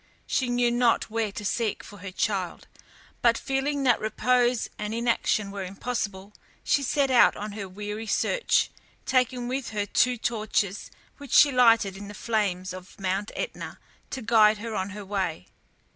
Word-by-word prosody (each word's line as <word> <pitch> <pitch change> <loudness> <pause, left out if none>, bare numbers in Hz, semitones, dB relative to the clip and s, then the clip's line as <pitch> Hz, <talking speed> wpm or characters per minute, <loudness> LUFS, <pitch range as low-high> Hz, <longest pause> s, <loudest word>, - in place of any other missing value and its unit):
She 255 -2 0
knew 245 0 +2
not 240 -2 +2
where 225 -2 -1
to 210 - -6
seek 220 0 -1
for 205 - -12
her 195 +1 -7
child, 185 -1 -2 0.5
but 235 -1 +4
feeling 275 +1 -1
that 250 -3 +4
repose 245 +2 +1
and 210 +1 -3
inaction 230 -3 0
were 200 -1 -5
impossible, 200 0 -4 0.3
she 285 - +2
set 275 0 +1
out 250 - +6
on 210 +1 -5
her 200 -2 -6
weary 210 +3 -6
search, - - +1 0.3
taking 250 -1 +1
with 260 0 -3
her 210 -2 -2
two 245 +4 +2
torches 215 -3 -1 0.3
which 285 -3 -8
she 290 - +7
lighted 230 -6 +4
in 200 +1 -8
the 205 - -9
flames 195 -5 -1
of 185 +1 -11
Mount 195 +2 -1
Etna - - -5 0.3
to 260 - -5
guide 215 -1 +5
her 225 +1 -6
on 190 -1 -2
her 205 0 -8
way. 190 - -2
220 Hz, 165 wpm, -26 LUFS, 200-245 Hz, 0.5 s, she